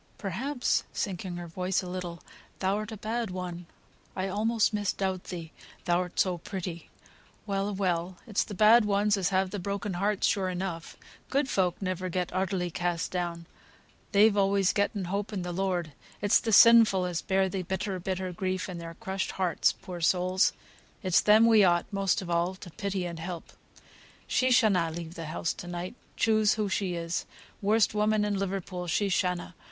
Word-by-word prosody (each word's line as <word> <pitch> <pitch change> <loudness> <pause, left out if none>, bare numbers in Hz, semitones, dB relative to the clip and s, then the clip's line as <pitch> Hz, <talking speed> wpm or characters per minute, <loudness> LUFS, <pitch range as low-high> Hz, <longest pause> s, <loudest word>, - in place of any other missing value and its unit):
Perhaps" 245 +8 -1
(sinking 185 -3 -3
her 175 - -6
voice 180 +3 -1
a - - -6
little) 180 -2 -6 0.3
"thou'rt 205 +3 -1
a 220 - -6
bad 225 +1 -2
one; 180 -2 -6 0.5
I 190 0 -2
almost 220 +3 +1
misdoubt 195 -2 -1
thee, 165 -3 -7 0.3
thou'rt 175 +1 0
so 180 -2 +2
pretty. 175 -2 -6 0.6
Well 195 0 -1
a - - -3
well! 180 -2 -1
it's 215 -4 0
the 205 - -8
bad 220 +4 +7
ones 205 0 +2
as 190 -3 0
have 190 -1 +1
the 205 - -3
broken 200 +1 -3
hearts, 200 +3 0
sure 190 -2 +1
enough; 180 -2 -5 0.3
good 280 0 +1
folk 185 -7 0
never 185 0 -2
get 180 0 -2
utterly 185 -1 -1
cast 175 0 -2
down, 175 -2 -3 0.7
they've 205 +1 +5
always 195 -1 +3
getten 200 -1 0
hope 200 +4 -3
in 195 -4 -3
the 180 - -4
Lord: 180 -3 -1 0.3
it's 205 0 +4
the 225 - -2
sinful 220 -4 +7
as 175 -2 -2
bear 190 0 +1
the 190 0 -3
bitter, 190 +1 -3
bitter 185 0 -3
grief 185 +1 -2
in 180 -2 -6
their 165 0 -8
crushed 190 -2 -3
hearts, 180 -4 +2
poor 180 -3 -9
souls; 185 +2 +3 0.5
it's 185 -2 +4
them 215 +2 +6
we 225 -3 +6
ought, 175 -2 +3
most 195 -1 +1
of 175 - -8
all, 170 +2 +1
to 185 -2 -11
pity 195 +1 -3
and 170 -1 -5
to 165 - -7
help. 175 -2 -7 0.7
She 255 - +2
shanna 205 -9 +4
leave 165 0 -6
the 165 -2 -6
house 160 +1 -2
to 175 - -9
night, 175 +2 -5 0.2
choose 215 -2 +3
who 210 -2 -1
she 190 -2 -1
is, 170 0 -3 0.3
worst 210 +1 +3
woman 210 0 +2
in 205 -2 -1
Liverpool, 185 -2 -3
she 185 +5 +1
shanna. 180 -1 -1
190 Hz, 180 wpm, -28 LUFS, 175-205 Hz, 0.7 s, bad